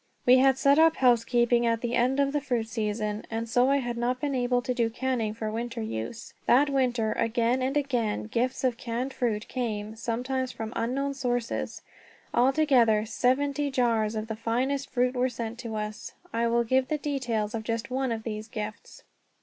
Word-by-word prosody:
We 255 +1 +7
had 265 0 +4
set 280 +2 +4
up 320 0 +6
housekeeping 240 -1 +3
at 230 0 +1
the 240 -1 -2
end 255 +3 +2
of 280 0 +2
the 295 - 0
fruit 245 -5 -1
season, 215 -2 -2
and 225 0 -3
so 245 +3 +3
I 280 - +4
had 240 -3 -3
not 245 +2 0
been 285 +1 -1
able 245 -1 +1
to 255 0 -1
do 235 -2 +1
canning 230 -3 -2
for 220 -1 -3
winter 235 +2 -4
use. 220 - -5
That 280 +3 +5
winter, 245 -5 +1
again 235 +3 +1
and 265 +3 0
again, 245 -7 0
gifts 245 +5 -1
of 250 -3 +1
canned 245 +3 -3
fruit 220 -3 -1
came, 220 -4 -3
sometimes 250 +3 -2
from 220 +1 -6
unknown 270 +5 -1
sources. 245 -3 -2 0.5
Altogether, 250 -5 +4
seventy 280 +5 +1
jars 230 -4 +1
of 215 0 -2
the 220 - -4
finest 255 +5 -1
fruit 250 0 +1
were 255 0 +1
sent 235 -1 -5
to 230 -2 -5
us. 210 0 -5 0.2
I 230 +1 +1
will 235 +1 +2
give 260 +2 +2
the 305 - 0
details 245 -8 -2
of 225 -1 -3
just 230 +2 -3
one 260 -1 0
of 225 -1 -3
these 215 -1 -5
gifts. 215 -2 -7
240 Hz, 190 wpm, -27 LUFS, 225-260 Hz, 0.5 s, We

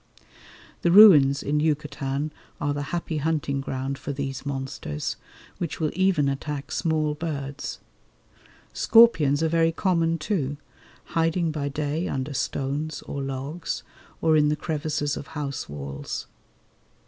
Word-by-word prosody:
The 170 - +2
ruins 150 -9 +8
in 150 +1 +1
Yucatan 150 -1 -1 0.3
are 145 0 0
the 145 - -3
happy 170 -2 -2
hunting 150 -2 0
ground 135 0 -3
for 145 - -4
these 135 -1 -4
monsters, 135 - -4 0.4
which 170 - -3
will 155 -2 0
even 185 -6 +2
attack 140 +1 -3
small 155 -2 0
birds. 145 -3 -4 1.0
Scorpions 165 -11 +5
are - - +3
very 165 0 +3
common, 165 -2 +1
too, 150 -4 -2 0.6
hiding 165 0 +1
by 145 -2 -2
day 150 +4 -2
under 135 +2 -3
stones 145 +4 -2
or 140 - -5
logs 135 +5 -4 0.4
or 160 -1 +4
in 150 -1 +4
the 150 - +2
crevices 150 -1 -2
of 145 - -7
house 140 - -4
walls. 70 -1 -5
150 Hz, 130 wpm, -25 LUFS, 140-160 Hz, 1.0 s, ruins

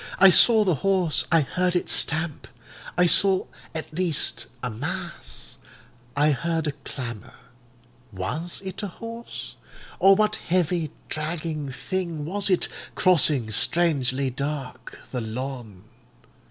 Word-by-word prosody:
I 195 0 +8
saw 220 +3 +7
the 185 -4 +2
horse; 190 -5 +2
I 165 -1 +5
heard 180 +5 -1
it 175 - 0
stamp—I 155 0 -2
saw 190 +2 +5 0.3
at 155 -1 -6
least 175 -3 +2 0.2
a 125 - -2
mass; 60 - -7 0.6
I 150 +1 +3
heard 165 +3 -1
a 150 - 0
clamour. 125 -5 -8 0.8
Was 125 - -4
it 190 +2 -6
a 205 - -3
horse? 230 +5 -9 0.4
or 195 +1 +7
what 215 +1 +1
heavy, 175 -2 0 0.2
dragging 155 -2 -4
thing 155 +4 -4
was 200 +5 -1
it, 185 - +2 0.3
crossing, 150 -10 +3
strangely 135 -1 +2
dark, 130 -2 -5
the 125 - -3
lawn. 115 -4 -6
155 Hz, 120 wpm, -24 LUFS, 130-185 Hz, 0.8 s, I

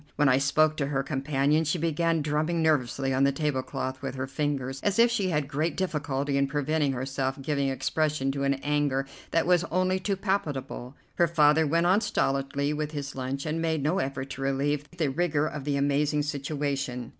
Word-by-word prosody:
When 145 -2 +3
I 130 +1 +4
spoke 155 +3 +3
to 140 - 0
her 135 -1 -1
companion 140 +2 +1
she 155 +3 0
began 165 0 +1
drumming 155 +3 0
nervously 135 -3 +1
on 130 +1 +2
the 140 - +4
tablecloth 130 -2 -2
with 135 -2 -4
her 130 0 -2
fingers, 135 -2 -2
as 205 -1 0
if 235 +1 +5
she 205 -5 0
had 150 -4 0
great 150 +3 -1
difficulty 145 -6 -1
in 140 - +2
preventing 145 0 0
herself 135 +1 -2
giving 140 0 0
expression 145 0 0
to 140 0 -3
an 140 0 +2
anger 145 -2 +1 0.2
that 165 - +1
was 180 -1 +4
only 185 +2 +1
too 195 +2 -1
palpable. 145 - -3 0.2
Her 170 - +4
father 155 -1 +4
went 165 +3 +2
on 190 +4 +4
stolidly 140 -8 0
with 150 0 -3
his 140 -2 -4
lunch, 135 +2 -3
and 160 +1 -1
made 160 -3 0
no 160 +6 +1
effort 135 0 -3
to 135 - -6
relieve 140 +2 -1
the 165 -5 -1
rigor 155 -1 +1
of 150 -3 -5
the 145 -1 0
amazing 145 +1 +1
situation. 140 -4 -3
145 Hz, 190 wpm, -27 LUFS, 135-160 Hz, 0.2 s, if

